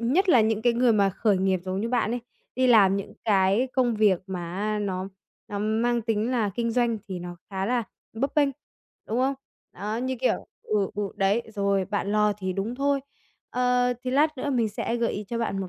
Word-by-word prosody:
nhất 310 Hz, +12 st, +2 dB
là 255 Hz, -8 st, +7 dB
những 220 Hz, 0 st, +1 dB
cái 240 Hz, 0 st, +4 dB
người 240 Hz, 0 st, +3 dB
mà 200 Hz, -2 st, +3 dB
khởi 200 Hz, +1 st, +1 dB
nghiệp 190 Hz, -1 st, +1 dB
giống 185 Hz, +1 st, -2 dB
như 225 Hz, -, -1 dB
bạn 235 Hz, -3 st, +1 dB
ấy, 245 Hz, +1 st, -2 dB, 0.3 s
đi 255 Hz, +1 st, +2 dB
làm 205 Hz, -6 st, +6 dB
những 200 Hz, -, -5 dB
cái 200 Hz, +4 st, +3 dB
công 245 Hz, -3 st, +2 dB
việc 205 Hz, -4 st, +3 dB
mà 175 Hz, -3 st, -5 dB
á, 210 Hz, +1 st, -1 dB
nó 190 Hz, -2 st, -2 dB, 0.4 s
nó 205 Hz, -, -4 dB
mang 225 Hz, +3 st, +1 dB
tính 220 Hz, +1 st, 0 dB
là 230 Hz, -5 st, +1 dB
kinh 235 Hz, 0 st, -1 dB
doanh, 235 Hz, -1 st, +1 dB
thì 185 Hz, -2 st, -4 dB
nó 175 Hz, 0 st, -7 dB
khá 190 Hz, 0 st, -2 dB
là 245 Hz, +1 st, +1 dB, 0.3 s
bấp 265 Hz, +5 st, -2 dB
bênh, 295 Hz, -2 st, +4 dB, 0.6 s
đúng 225 Hz, -, 0 dB
không? 265 Hz, +2 st, +2 dB, 0.4 s
Đó, 210 Hz, +4 st, -4 dB
như 255 Hz, +2 st, -2 dB
kiểu 255 Hz, -, 0 dB, 0.2 s
ừ, 205 Hz, -3 st, 0 dB
ừ, 210 Hz, -, -2 dB
đấy, 200 Hz, +4 st, +2 dB
rồi 200 Hz, -1 st, +1 dB
bạn 205 Hz, 0 st, -2 dB
lo 210 Hz, 0 st, +3 dB
thì 190 Hz, -2 st, -2 dB
đúng 200 Hz, +5 st, -3 dB
thôi. 280 Hz, +1 st, +1 dB, 0.5 s
Ờ, 250 Hz, 0 st, +2 dB
thì 255 Hz, -, -2 dB
lát 300 Hz, +3 st, +2 dB
nữa 285 Hz, -, -2 dB
mình 240 Hz, -4 st, +1 dB
sẽ 230 Hz, +3 st, -2 dB
gợi 235 Hz, -1 st, 0 dB
ý 210 Hz, -, -4 dB
cho 235 Hz, -, -2 dB
bạn 215 Hz, -4 st, -1 dB
một 190 Hz, -, -4 dB
220 Hz, 220 wpm, -26 LUFS, 200-245 Hz, 0.6 s, là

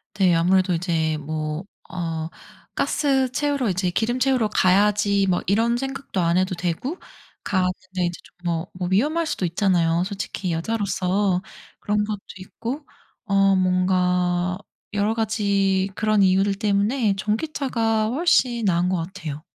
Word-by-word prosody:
네. 185 Hz, -4 st, +3 dB
아무래도 185 Hz, +2 st, +3 dB
이제 165 Hz, -2 st, 0 dB
뭐 155 Hz, +2 st, -4 dB, 0.3 s
어 165 Hz, -2 st, -3 dB, 0.5 s
'가스 270 Hz, -3 st, +1 dB
채우러 285 Hz, -5 st, 0 dB
이제 185 Hz, 0 st, 0 dB
기름 235 Hz, +6 st, 0 dB
채우러 255 Hz, -4 st, +2 dB
가야지.' 200 Hz, +1 st, +3 dB
뭐 175 Hz, -, +1 dB
이런 225 Hz, +4 st, +2 dB
생각도 270 Hz, -7 st, -3 dB
안 170 Hz, +1 st, +2 dB
해도 185 Hz, 0 st, +1 dB
되고 180 Hz, -, -3 dB, 0.5 s
가는데 185 Hz, -2 st, +1 dB, 0.3 s
이제 175 Hz, 0 st, -3 dB
좀 -, -, -20 dB
뭐 170 Hz, +1 st, -1 dB
뭐 180 Hz, -1 st, -4 dB
위험할 300 Hz, -, +1 dB
수도 195 Hz, -, -2 dB
있잖아요 170 Hz, -1 st, +2 dB
솔직히 195 Hz, -2 st, -4 dB
여자로서. 190 Hz, 0 st, 0 dB, 0.4 s
그런 210 Hz, 0 st, 0 dB
것도 210 Hz, -2 st, -4 dB, 0.2 s
있고 240 Hz, +9 st, -6 dB, 0.4 s
어 195 Hz, -1 st, +3 dB
뭔가 180 Hz, -1 st, +1 dB, 0.4 s
여러 205 Hz, +2 st, +1 dB
가지 200 Hz, -3 st, +1 dB
그런 215 Hz, -2 st, +2 dB
이유들 195 Hz, +1 st, +3 dB
때문에 210 Hz, +2 st, +1 dB
전기차가 225 Hz, -1 st, 0 dB
훨씬 250 Hz, -5 st, +2 dB
나은 180 Hz, -2 st, +2 dB
것 185 Hz, -, +1 dB
같아요. 160 Hz, -5 st, -7 dB
195 Hz, 280 characters per minute, -23 LUFS, 180-220 Hz, 0.5 s, 네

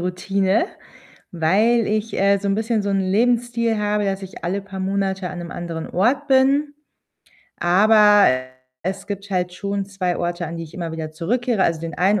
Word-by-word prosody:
Routine, 190 Hz, +3 st, 0 dB, 0.7 s
weil 210 Hz, +8 st, +2 dB
ich, 215 Hz, +1 st, -2 dB
äh, 200 Hz, +1 st, +3 dB
so 200 Hz, 0 st, -3 dB
'n 195 Hz, -, +2 dB
bisschen 220 Hz, 0 st, 0 dB
so 200 Hz, -, -2 dB
'n 195 Hz, -, +1 dB
Lebensstil 235 Hz, +3 st, +1 dB
habe, 210 Hz, 0 st, 0 dB
dass 195 Hz, 0 st, -2 dB
ich 190 Hz, -2 st, -9 dB
alle 190 Hz, +4 st, -1 dB
paar 195 Hz, -1 st, -8 dB
Monate 190 Hz, -1 st, -1 dB
an 180 Hz, -, -7 dB
'nem 175 Hz, 0 st, -7 dB
anderen 165 Hz, -2 st, -5 dB
Ort 265 Hz, +10 st, +1 dB
bin. 275 Hz, +2 st, +3 dB, 0.8 s
Aber 205 Hz, +3 st, +5 dB, 0.6 s
es 190 Hz, +1 st, -4 dB
gibt 200 Hz, 0 st, -6 dB
halt 180 Hz, -2 st, -1 dB
schon 200 Hz, 0 st, -3 dB
2 185 Hz, -3 st, -2 dB
Orte, 175 Hz, 0 st, -2 dB
an 165 Hz, +2 st, -6 dB
die 165 Hz, -, -5 dB
ich 155 Hz, -, -14 dB
immer 170 Hz, -2 st, -5 dB
wieder 155 Hz, -1 st, -5 dB
zurückkehre. 220 Hz, +5 st, 0 dB
Also, 165 Hz, -2 st, +1 dB
den 165 Hz, 0 st, -5 dB
einen 195 Hz, +3 st, +2 dB
195 Hz, 180 wpm, -21 LUFS, 180-215 Hz, 0.8 s, Aber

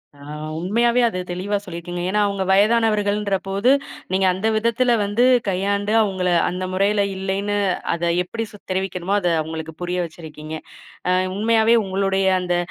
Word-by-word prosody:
ஆ. -, -, -19 dB, 0.4 s
உண்மையாவே 235 Hz, +7 st, +2 dB
அது 185 Hz, -5 st, -3 dB
தெளிவா 200 Hz, +3 st, -1 dB
சொல்லிருக்கீங்க, 175 Hz, -1 st, -6 dB
ஏன்னா, 210 Hz, +2 st, +1 dB
அவங்க 200 Hz, -1 st, -2 dB
வயதானவர்கள்ன்ற 210 Hz, -1 st, +2 dB
போது, 200 Hz, +7 st, +2 dB, 0.4 s
நீங்க 190 Hz, 0 st, +2 dB
அந்த 195 Hz, +4 st, -2 dB
விதத்துல 235 Hz, +2 st, +1 dB
வந்து 205 Hz, +4 st, +1 dB, 0.2 s
கையாண்டு 200 Hz, +2 st, 0 dB
அவங்கள 185 Hz, -3 st, -1 dB, 0.2 s
அந்த 185 Hz, +1 st, -4 dB
முறையில 200 Hz, +2 st, +2 dB
இல்லைன்னு 195 Hz, +2 st, -2 dB, 0.4 s
அத 170 Hz, 0 st, 0 dB
எப்டி, 225 Hz, +5 st, -4 dB
சொ 205 Hz, -, -12 dB
தெரிவிக்கணுமோ 190 Hz, 0 st, -2 dB
அத 180 Hz, -, -1 dB
அவங்களுக்கு 160 Hz, 0 st, -6 dB
புரிய 180 Hz, +1 st, -2 dB
வச்சிருக்கீங்க. 155 Hz, -1 st, -10 dB, 0.6 s
ஆ, -, -, +3 dB, 0.2 s
உண்மையாவே 225 Hz, +2 st, +3 dB
உங்களுடைய 195 Hz, 0 st, 0 dB
அந்த, 180 Hz, -1 st, 0 dB
195 Hz, 140 wpm, -21 LUFS, 180-210 Hz, 0.6 s, ஆ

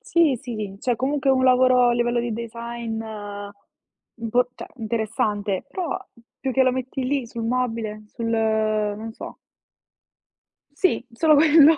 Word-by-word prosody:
Sì, 320 Hz, -5 st, +5 dB
sì, 245 Hz, -1 st, -6 dB
sì, 205 Hz, -2 st, -5 dB
c'è 245 Hz, +3 st, 0 dB
comunque 270 Hz, +2 st, +1 dB
un 260 Hz, -1 st, +3 dB
lavoro 255 Hz, -1 st, +5 dB
a -, -, +4 dB
livello 240 Hz, 0 st, +1 dB
di 235 Hz, -1 st, -2 dB
design 235 Hz, 0 st, -5 dB, 1.2 s
impor 235 Hz, +2 st, +1 dB
cioè -, -, -9 dB
interessante, 215 Hz, -3 st, -1 dB
però 355 Hz, -6 st, -3 dB, 0.4 s
più 265 Hz, -, -1 dB
che 265 Hz, -, +3 dB
lo 255 Hz, -1 st, +4 dB
metti 260 Hz, +1 st, -3 dB
lì 270 Hz, 0 st, 0 dB
sul 230 Hz, 0 st, -6 dB
mobile, 225 Hz, -3 st, -1 dB
sul, 230 Hz, +1 st, -4 dB
ehm, 215 Hz, -2 st, +1 dB
non 225 Hz, +1 st, -6 dB
so -, -, -9 dB, 1.3 s
Sì, 290 Hz, -4 st, +1 dB
solo 305 Hz, +6 st, +4 dB
quello. 310 Hz, +1 st, +7 dB
240 Hz, 150 wpm, -23 LUFS, 225-260 Hz, 1.3 s, quello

